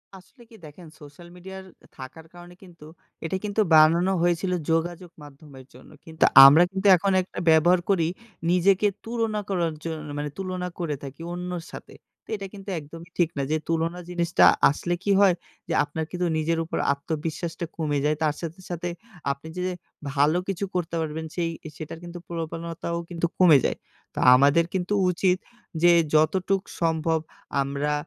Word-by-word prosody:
আসলে 195 Hz, +7 st, -17 dB
কি 230 Hz, -, -15 dB
দেখেন 155 Hz, +3 st, -13 dB
সোশ্যাল 150 Hz, +3 st, -14 dB
মিডিয়ার 190 Hz, +1 st, -10 dB, 0.3 s
থাকার 140 Hz, +5 st, -10 dB
কারণে 175 Hz, 0 st, -13 dB
কিন্তু, 170 Hz, -4 st, -15 dB, 0.4 s
এটা 175 Hz, +4 st, -2 dB
কিন্তু 210 Hz, +1 st, 0 dB
বানানো 165 Hz, +4 st, +5 dB
হয়েছিলো 175 Hz, +1 st, +1 dB, 0.2 s
যোগাযোগ 170 Hz, +2 st, -2 dB
মাধ্যমের 140 Hz, -2 st, -14 dB
জন্য। -, -, -16 dB, 0.2 s
কিন্তু 160 Hz, 0 st, -2 dB, 0.2 s
আমরা 145 Hz, +5 st, +8 dB
কিন্তু 195 Hz, +1 st, -1 dB
এখন 195 Hz, +3 st, 0 dB
একটা 185 Hz, -, -8 dB
ব্যবহার 165 Hz, +3 st, +5 dB
করি 175 Hz, -5 st, +2 dB, 0.4 s
নিজেকে 190 Hz, +3 st, +3 dB, 0.2 s
তুলনা 225 Hz, -2 st, -2 dB
করার 170 Hz, -4 st, 0 dB
জন 165 Hz, -1 st, -4 dB, 0.2 s
মানে 145 Hz, 0 st, -3 dB
তুলনা 185 Hz, -1 st, -4 dB
করে 160 Hz, -4 st, -2 dB
থাকি 140 Hz, +3 st, -9 dB
অন্যর 180 Hz, -1 st, -5 dB
সাথে। -, -, -10 dB, 0.3 s
তে -, -, -11 dB
এটা 195 Hz, -1 st, -7 dB
কিন্তু 195 Hz, 0 st, -10 dB
একদমই 165 Hz, +3 st, -12 dB
ঠিক 175 Hz, -3 st, +2 dB
না। -, -, 0 dB
যে 155 Hz, -, +2 dB
তুলনা 165 Hz, +2 st, -1 dB
জিনিসটা 175 Hz, -1 st, +2 dB, 0.2 s
আসলে 170 Hz, +5 st, -2 dB
কী 200 Hz, -, +1 dB
হয়! 195 Hz, -3 st, +5 dB, 0.3 s
যে 170 Hz, -, -2 dB
আপনার 155 Hz, +2 st, -4 dB
কিন্তু 180 Hz, -1 st, -1 dB
নিজের 165 Hz, +1 st, 0 dB
উপর 160 Hz, -, -4 dB, 0.2 s
আত্মবিশ্বাসটা 160 Hz, +4 st, -4 dB
কমে 150 Hz, -3 st, -1 dB
যায়। 150 Hz, +1 st, +2 dB
তার 150 Hz, -1 st, +1 dB
সাথে, 165 Hz, +2 st, -6 dB
সাথে 175 Hz, 0 st, -4 dB, 0.4 s
আপনি 140 Hz, +3 st, -8 dB
যে -, -, -2 dB, 0.5 s
ভালো 145 Hz, +4 st, +3 dB
কিছু 195 Hz, 0 st, -2 dB
করতে 170 Hz, -2 st, -2 dB
পারবেন 160 Hz, 0 st, -4 dB
সেই 170 Hz, -2 st, -1 dB, 0.3 s
সেটার 160 Hz, 0 st, -8 dB
কিন্তু 175 Hz, 0 st, -8 dB
প্রবণতাও 165 Hz, 0 st, -5 dB
কিন্তু 170 Hz, -1 st, -2 dB
কমে 170 Hz, -6 st, +7 dB
যায়। -, -, -1 dB, 0.4 s
তা -, -, -4 dB, 0.2 s
আমাদের 140 Hz, +5 st, +4 dB
কিন্তু 190 Hz, +1 st, -1 dB, 0.2 s
উচিত 180 Hz, +1 st, +1 dB, 0.4 s
যে 175 Hz, 0 st, +6 dB, 0.2 s
যতটুক 185 Hz, +5 st, +2 dB, 0.2 s
সম্ভব 160 Hz, -1 st, +1 dB, 0.4 s
আমরা 140 Hz, +2 st, -2 dB
170 Hz, 160 wpm, -25 LUFS, 155-180 Hz, 0.5 s, আমরা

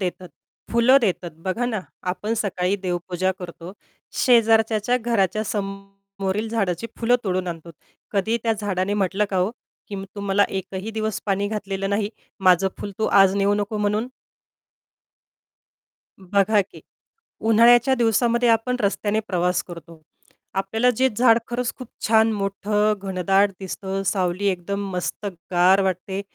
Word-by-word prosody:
देतात, 180 Hz, -1 st, -4 dB, 0.4 s
फुलं 235 Hz, +4 st, +6 dB
देतात. 180 Hz, -6 st, -1 dB
बघा 190 Hz, +8 st, -2 dB
ना 220 Hz, -5 st, -2 dB, 0.3 s
आपण 215 Hz, +4 st, -3 dB
सकाळी 195 Hz, -3 st, 0 dB
देवपूजा 185 Hz, 0 st, -2 dB
करतो, 175 Hz, 0 st, -9 dB, 0.4 s
शेजारच्याच्या 225 Hz, -1 st, +3 dB
घराच्या 215 Hz, -3 st, 0 dB
समोरील 195 Hz, +1 st, -4 dB
झाडाची 200 Hz, -3 st, -1 dB
फुलं 245 Hz, +1 st, +3 dB
तोडून 185 Hz, -1 st, -1 dB
आणतो. 170 Hz, 0 st, -7 dB, 0.4 s
कधीही 220 Hz, +4 st, +1 dB
त्या 225 Hz, -1 st, +2 dB
झाडाने 200 Hz, 0 st, -1 dB
म्हटलं 200 Hz, +1 st, +1 dB
का 190 Hz, -, -1 dB
हो, 185 Hz, +3 st, +1 dB, 0.4 s
की 200 Hz, -, -5 dB, 0.2 s
"तु 205 Hz, -, -6 dB
मला 200 Hz, 0 st, +2 dB
एकही 190 Hz, +2 st, -5 dB
दिवस 220 Hz, -1 st, -3 dB
पाणी 200 Hz, 0 st, 0 dB
घातलेलं 195 Hz, -2 st, -3 dB
नाही. 205 Hz, 0 st, 0 dB, 0.3 s
माझं 185 Hz, 0 st, +4 dB
फुल 205 Hz, -, -5 dB
तू 220 Hz, -, +1 dB
आज 195 Hz, 0 st, +6 dB
नेऊ 200 Hz, 0 st, +2 dB
नको" 205 Hz, +1 st, -2 dB
म्हणून. 210 Hz, +3 st, 0 dB, 2.1 s
बघा 200 Hz, +2 st, +2 dB
की. 195 Hz, -, -12 dB, 0.6 s
उन्हाळ्याच्या 240 Hz, +4 st, +5 dB
दिवसामध्ये 235 Hz, 0 st, +2 dB
आपण 230 Hz, +2 st, +2 dB
रस्त्याने 210 Hz, +1 st, 0 dB
प्रवास 180 Hz, 0 st, +1 dB
करतो. 170 Hz, -2 st, -12 dB, 0.6 s
आपल्याला 220 Hz, +6 st, +2 dB
जे 260 Hz, +2 st, +3 dB
झाड 235 Hz, -1 st, +5 dB
खरंच 240 Hz, 0 st, -2 dB
खूप 255 Hz, -3 st, -9 dB, 0.2 s
छान 220 Hz, 0 st, +4 dB
मोठं, 210 Hz, +1 st, 0 dB
घनदाट 195 Hz, +1 st, +1 dB
दिसतं, 195 Hz, +1 st, -4 dB
सावली 185 Hz, 0 st, 0 dB
एकदम 200 Hz, +2 st, -2 dB
मस्त 180 Hz, +3 st, -4 dB, 0.3 s
गार 185 Hz, +3 st, +5 dB
वाटते. 190 Hz, +1 st, -2 dB
200 Hz, 135 wpm, -23 LUFS, 190-220 Hz, 2.1 s, फुलं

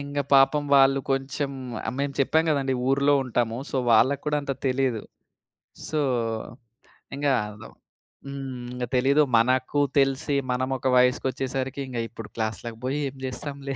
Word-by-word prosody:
ఇంగ 145 Hz, 0 st, -5 dB, 0.2 s
పాపం 135 Hz, +2 st, +5 dB
వాళ్ళు 135 Hz, 0 st, +5 dB
కొంచెం 135 Hz, +1 st, -1 dB, 0.4 s
ఆహ్, 110 Hz, -, -2 dB
మేము 140 Hz, 0 st, -1 dB
చెప్పాం 160 Hz, +4 st, +3 dB
గదండీ, 135 Hz, -3 st, +1 dB, 0.2 s
ఊర్లో 140 Hz, +1 st, +3 dB
ఉంటాము. 120 Hz, -2 st, -1 dB
సో, -, -, -2 dB, 0.2 s
వాళ్ళకి 130 Hz, +5 st, +4 dB
కూడా 150 Hz, 0 st, +1 dB
అంత 140 Hz, -, -2 dB
తెలీదు. 130 Hz, -4 st, 0 dB, 0.9 s
సో, 155 Hz, -, 0 dB, 1.2 s
ఇంగా 145 Hz, -1 st, +2 dB
అదో 105 Hz, +1 st, -11 dB, 0.6 s
హ్మ్. 135 Hz, -1 st, -6 dB, 0.2 s
ఇంగ 125 Hz, 0 st, -4 dB
తెలీదు. 140 Hz, +4 st, +4 dB
మనకు 130 Hz, +4 st, +2 dB, 0.2 s
తెలిసి 135 Hz, +1 st, +1 dB, 0.2 s
మనమొక 130 Hz, +1 st, -1 dB
వయసుకొచ్చేసరికి 130 Hz, +1 st, 0 dB
ఇంగ 125 Hz, -, -6 dB
ఇప్పుడు 115 Hz, -2 st, -9 dB
క్లాస్‌లకి 115 Hz, +1 st, -4 dB
బోయి 135 Hz, +3 st, -1 dB
ఏం 135 Hz, -, -15 dB
జేస్తాంలే. 140 Hz, +1 st, -5 dB
135 Hz, 135 wpm, -25 LUFS, 125-140 Hz, 1.2 s, పాపం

